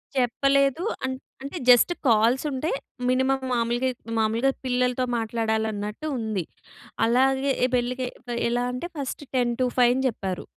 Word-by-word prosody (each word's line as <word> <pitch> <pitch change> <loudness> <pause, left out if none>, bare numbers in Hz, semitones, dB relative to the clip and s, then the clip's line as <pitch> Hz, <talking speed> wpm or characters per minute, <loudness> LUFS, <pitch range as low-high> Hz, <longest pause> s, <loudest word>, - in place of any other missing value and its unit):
చెప్పలేదు. 275 +4 +2 0.2
అం 260 - -1 0.3
అంటే 280 +6 -5
just 245 +7 +7 0.2
calls 230 +3 +4
ఉంటే 270 +4 -2 0.4
మినిమమ్ 260 +1 +1
మామూలుగా 240 +2 +1 0.3
మామూలుగా 225 +5 +2
పిల్లలతో 250 0 +1
మాట్లాడాలన్నట్టు 220 +1 -2
ఉంది. 220 -5 -2 0.6
అలాగే 265 +3 +2
ఎ - - +3
పెళ్ళికి 250 +1 -1 0.4
ఎలా 245 +1 0
అంటే 250 +8 -4
ఫస్ట్ 280 +1 -4
10-5 245 0 +2
అని 265 - 0
జెప్పారు. 195 -6 -4
250 Hz, 120 wpm, -25 LUFS, 230-265 Hz, 0.6 s, just